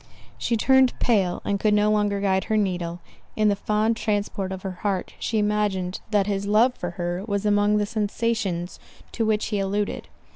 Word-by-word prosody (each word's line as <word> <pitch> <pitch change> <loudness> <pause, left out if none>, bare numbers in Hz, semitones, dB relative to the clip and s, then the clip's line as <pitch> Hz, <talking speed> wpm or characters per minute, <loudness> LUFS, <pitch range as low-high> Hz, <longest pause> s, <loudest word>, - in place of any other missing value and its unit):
She 230 - 0
turned 265 +2 +4
pale, 195 -7 +1
and 200 -1 0
could 210 0 +3
no 210 0 +3
longer 205 -1 +1
guide 190 -1 +1
her 220 -1 0
needle—in 180 +2 -2
the 200 - +2
fond 215 +3 0
transport 205 -3 -2
of 190 -1 -6
her 185 -2 -6
heart 195 -3 -2
she 225 - -1
imagined 205 -3 0
that 205 -3 +2
his 200 0 -2
love 225 +5 +4
for 175 - -5
her, 175 +1 -2
was 200 -1 -1
among 205 0 +3
the 210 - +1
sensations 210 -4 -2 0.3
to 225 -2 -1
which 215 -1 +1
he 205 - -1
alluded. 200 +1 -2
205 Hz, 180 wpm, -24 LUFS, 190-215 Hz, 0.3 s, turned